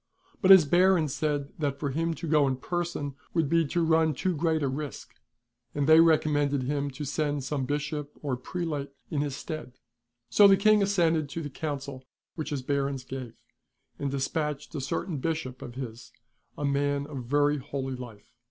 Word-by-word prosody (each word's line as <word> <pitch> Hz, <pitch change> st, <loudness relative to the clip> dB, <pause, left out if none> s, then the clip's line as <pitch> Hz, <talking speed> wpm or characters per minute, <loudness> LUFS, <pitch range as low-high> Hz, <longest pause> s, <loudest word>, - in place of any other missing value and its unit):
But 190 Hz, -, +3 dB
his 190 Hz, -5 st, +10 dB
Barons 175 Hz, -3 st, +3 dB
said 145 Hz, -2 st, -1 dB
that 140 Hz, -2 st, -1 dB
for 145 Hz, -2 st, -2 dB
him 165 Hz, +3 st, -1 dB
to 165 Hz, -, -6 dB
go 150 Hz, -2 st, +4 dB
in 130 Hz, -, 0 dB
person 170 Hz, -1 st, -3 dB, 0.2 s
would 165 Hz, -3 st, +2 dB
be 165 Hz, +1 st, +2 dB
to 170 Hz, +2 st, 0 dB
run 160 Hz, -2 st, +3 dB
too 185 Hz, +5 st, -1 dB
great 160 Hz, 0 st, +1 dB
a -, -, +2 dB
risk; 145 Hz, +2 st, -5 dB, 0.6 s
and 145 Hz, -1 st, +1 dB
they 160 Hz, +2 st, +7 dB
recommended 145 Hz, -4 st, +3 dB
him 140 Hz, +2 st, -1 dB
to 145 Hz, +2 st, -6 dB
send 145 Hz, 0 st, -1 dB
some 135 Hz, 0 st, -2 dB
bishop 150 Hz, 0 st, -3 dB
or 140 Hz, -3 st, -1 dB
prelate 150 Hz, +1 st, -4 dB, 0.2 s
in 145 Hz, -3 st, 0 dB
his 145 Hz, -2 st, -2 dB
stead. 155 Hz, -4 st, -6 dB, 0.5 s
So 205 Hz, -, +7 dB
the 195 Hz, -1 st, +6 dB
King 215 Hz, +1 st, +5 dB
assented 165 Hz, -6 st, +2 dB
to 165 Hz, +3 st, -5 dB
the 145 Hz, -, -6 dB
counsel 140 Hz, -3 st, -5 dB, 0.3 s
which 155 Hz, -2 st, -5 dB
his 140 Hz, -4 st, -3 dB
Barons 140 Hz, -1 st, -1 dB
gave, 130 Hz, -3 st, -7 dB, 0.6 s
and 140 Hz, -, -1 dB
despatched 145 Hz, +2 st, -2 dB
a 145 Hz, -, -3 dB
certain 150 Hz, +4 st, -2 dB
Bishop 155 Hz, -4 st, -3 dB
of 120 Hz, -, -8 dB
his, 120 Hz, -3 st, -7 dB, 0.5 s
a 145 Hz, -, -2 dB
man 140 Hz, 0 st, 0 dB
of 140 Hz, -4 st, -7 dB
very 145 Hz, +3 st, +2 dB
holy 135 Hz, -1 st, -4 dB
life. 115 Hz, -4 st, -11 dB
145 Hz, 180 wpm, -28 LUFS, 140-160 Hz, 0.6 s, his